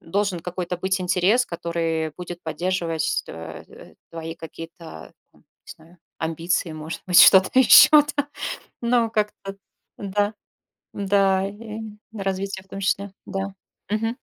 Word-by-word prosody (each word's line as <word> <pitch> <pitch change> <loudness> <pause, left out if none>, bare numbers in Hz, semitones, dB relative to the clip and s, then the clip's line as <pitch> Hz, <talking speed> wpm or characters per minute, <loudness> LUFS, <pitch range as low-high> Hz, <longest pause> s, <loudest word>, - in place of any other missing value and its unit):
должен 195 0 -1
какой-то 180 0 -4
быть 190 +1 0
интерес, 185 +7 +2
который 165 -2 -2
будет 175 -1 -8
поддерживать, 165 -1 -1
э, 80 0 -9
э, - - -15 0.2
твои 165 0 -6
какие-то 165 - -10 0.2
там, - - -26
не - - -47 0.3
знаю, 165 +2 -20 0.2
амбиции, 165 +2 -1
может 155 +1 -7
быть, 180 -2 +7
что-то 190 -1 +7
еще 265 +4 +9
там, 295 -1 +4 0.5
ну, 235 -1 +2
как-то 210 -2 -3 0.4
да, 205 +1 -1 0.6
да, 195 -1 +2
и 215 +1 -8 0.4
развитие 195 -1 -3
в 195 - -30
том 195 - -7
числе. 195 0 -1
Да. 195 0 -4 0.4
Мгм. 225 +3 -1
190 Hz, 130 wpm, -23 LUFS, 170-205 Hz, 0.6 s, еще